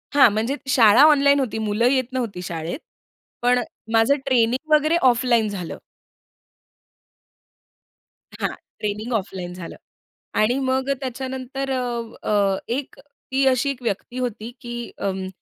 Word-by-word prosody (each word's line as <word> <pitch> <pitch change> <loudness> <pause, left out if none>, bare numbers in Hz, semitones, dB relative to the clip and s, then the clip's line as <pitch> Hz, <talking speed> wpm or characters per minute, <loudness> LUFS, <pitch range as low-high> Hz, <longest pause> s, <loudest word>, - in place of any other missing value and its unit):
हां, 280 -4 +7
म्हणजे 225 +6 0
शाळा 230 0 +6
ऑनलाईन 280 -1 +4
होती. 245 -5 -2
मुलं 210 +3 +1
येत 260 -1 +2
नव्हती 230 -8 -3
शाळेत, 170 - -4 0.6
पण 245 +1 +3 0.3
माझं 225 +5 +4
ट्रेनिंग 255 +3 +1
वगैरे 310 +2 +4
ऑफलाईन 235 -2 +2
झालं. 185 -5 -5 2.6
हां, - - 0 0.3
ट्रेनिंग 210 +3 -3
ऑफलाईन 190 -4 -3
झालं. 180 -2 -8 0.6
आणि 230 +4 +3
मग 265 0 0
त्याच्यानंतर 265 +1 -4
अ, 260 -1 0 0.5
अ, 200 -2 +2
एक 260 +4 -3 0.4
ती 270 +1 +2
अशी 265 +2 +2
एक 270 -2 -4
व्यक्ती 235 +2 -3
होती, 235 -2 -4
की 240 0 -6
अं, 190 -1 -3
240 Hz, 125 wpm, -22 LUFS, 210-265 Hz, 2.6 s, हां